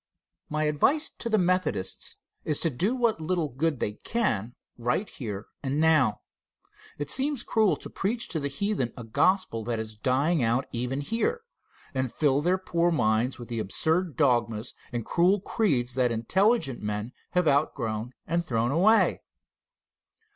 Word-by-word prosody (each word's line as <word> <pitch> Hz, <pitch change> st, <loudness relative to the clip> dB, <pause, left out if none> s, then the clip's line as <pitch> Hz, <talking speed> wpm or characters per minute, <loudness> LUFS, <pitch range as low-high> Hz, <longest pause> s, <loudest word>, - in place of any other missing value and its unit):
My 155 Hz, 0 st, -1 dB
advice 155 Hz, -, +2 dB
to 235 Hz, -, -3 dB
the 220 Hz, -, +3 dB
Methodists 180 Hz, -, -1 dB, 0.3 s
is 150 Hz, -, 0 dB
to 165 Hz, -, +1 dB
do 190 Hz, -, 0 dB
what 235 Hz, -8 st, +1 dB
little 165 Hz, -1 st, -1 dB
good 140 Hz, +2 st, -1 dB
they 105 Hz, -, -1 dB
can 120 Hz, -, -1 dB, 0.2 s
right 120 Hz, -, -1 dB
here 105 Hz, -, -6 dB, 0.2 s
and 140 Hz, +2 st, -1 dB
now. 155 Hz, -9 st, +3 dB, 0.8 s
It 145 Hz, 0 st, -2 dB
seems 275 Hz, -1 st, 0 dB
cruel 220 Hz, -3 st, +2 dB
to -, -, -6 dB
preach 225 Hz, +4 st, -2 dB
to 160 Hz, -, -2 dB
the 140 Hz, -, -1 dB
heathen 140 Hz, -, -1 dB
a 120 Hz, -, -6 dB
gospel 115 Hz, -, +1 dB
that 120 Hz, -1 st, -1 dB
is 110 Hz, -1 st, -5 dB
dying 135 Hz, +8 st, +1 dB
out 120 Hz, +3 st, +2 dB
even 125 Hz, +3 st, -2 dB
here, 235 Hz, -, -1 dB, 0.5 s
and 130 Hz, -2 st, -1 dB
fill 145 Hz, -2 st, +2 dB
their 180 Hz, +4 st, +2 dB
poor 175 Hz, -2 st, +1 dB
minds 115 Hz, -3 st, +1 dB
with 120 Hz, -, -9 dB
the 115 Hz, -2 st, -3 dB
absurd 160 Hz, -, 0 dB
dogmas 120 Hz, -5 st, +1 dB, 0.2 s
and 120 Hz, -2 st, -3 dB
cruel 185 Hz, +4 st, +3 dB
creeds 145 Hz, -, 0 dB
that 125 Hz, -1 st, +2 dB
intelligent 135 Hz, -, +1 dB
men 105 Hz, +2 st, -3 dB, 0.2 s
have 180 Hz, -2 st, +2 dB
outgrown 125 Hz, -5 st, 0 dB
and 170 Hz, +1 st, 0 dB
thrown 120 Hz, -5 st, 0 dB
away. 200 Hz, +9 st, +4 dB
145 Hz, 155 wpm, -27 LUFS, 120-185 Hz, 0.8 s, away